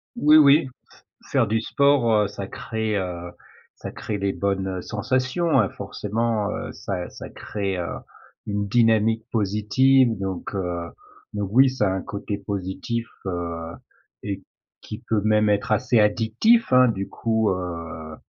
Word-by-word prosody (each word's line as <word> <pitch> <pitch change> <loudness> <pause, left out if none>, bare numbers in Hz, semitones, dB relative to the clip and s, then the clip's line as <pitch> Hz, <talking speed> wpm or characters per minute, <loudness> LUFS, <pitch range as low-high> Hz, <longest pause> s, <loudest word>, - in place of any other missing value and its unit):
Oui 155 -9 +6
oui, 145 0 +6 0.6
f - - -17
faire 135 -4 +3
du 110 +1 0
sport, 140 -2 +2
heu, 105 -1 +3
ça 100 -1 -7
crée, 110 0 -3
heu, 90 -2 -4 0.4
ça - - -8
crée 105 - -4
les 100 0 -1
bonnes 95 -2 -2
sensations, 130 - 0
hein, 105 -5 +2
forcément, 110 0 -2
heu, - - -4
ça 90 -3 -5
ça - - -9
crée, 100 -3 -4
heu, 90 - -3 0.6
une 100 -1 -2
dynamique 115 0 +3
positive 115 +5 +3
donc, 95 0 -4
heu, 85 -2 -3 0.4
donc 105 -2 -3
oui, 135 +2 +6
ça 130 -6 0
a - - -1
un 95 - -2
côté 100 +1 -5
positif, 100 +4 -4 0.2
heu 85 -2 -4 0.5
et 100 -1 -4 0.4
qui 110 +3 -9
peut 110 -2 +1
même 105 0 +3
être 105 +1 0
assez 110 +1 +2
addictif, 115 - +3
hein, 125 0 +7
du 100 -4 -2
coup, 110 -2 0
heu 85 -3 -5
105 Hz, 150 wpm, -23 LUFS, 95-115 Hz, 0.6 s, hein